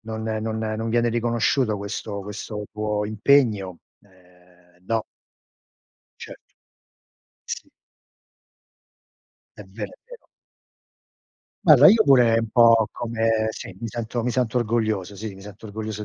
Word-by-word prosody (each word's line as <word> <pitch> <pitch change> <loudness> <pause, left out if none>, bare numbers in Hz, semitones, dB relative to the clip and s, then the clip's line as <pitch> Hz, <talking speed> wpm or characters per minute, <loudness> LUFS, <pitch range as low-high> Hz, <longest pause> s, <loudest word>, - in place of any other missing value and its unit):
non 110 0 -6
non 110 0 -3
non 110 +1 -3
viene 120 +1 +1
riconosciuto 120 0 0
questo 100 0 -5
questo 105 +1 -7
tuo 105 -1 -2
impegno, 105 -4 +2 0.2
ehm, 90 -2 -26
no. 115 0 0 1.2
Certo. - - -12 0.9
Sì. - - -7 1.9
È 105 - -9
vero, 100 +2 -7
è - - -26
vero. - - -14 1.4
Guarda, - - +8
io 220 +1 +6
pure 125 -5 +5
un 115 0 -2
po' 115 -1 +5
come 115 -2 -1
sì, 95 - -9
mi 115 - -5
sento 115 +1 -4
mi 125 - -1
sento 125 -1 -1
orgoglioso 110 -4 -1
sì, 105 0 -7
mi 95 - -13
sento 105 +2 -11
orgoglioso 110 0 -6
110 Hz, 125 wpm, -23 LUFS, 105-115 Hz, 1.9 s, Guarda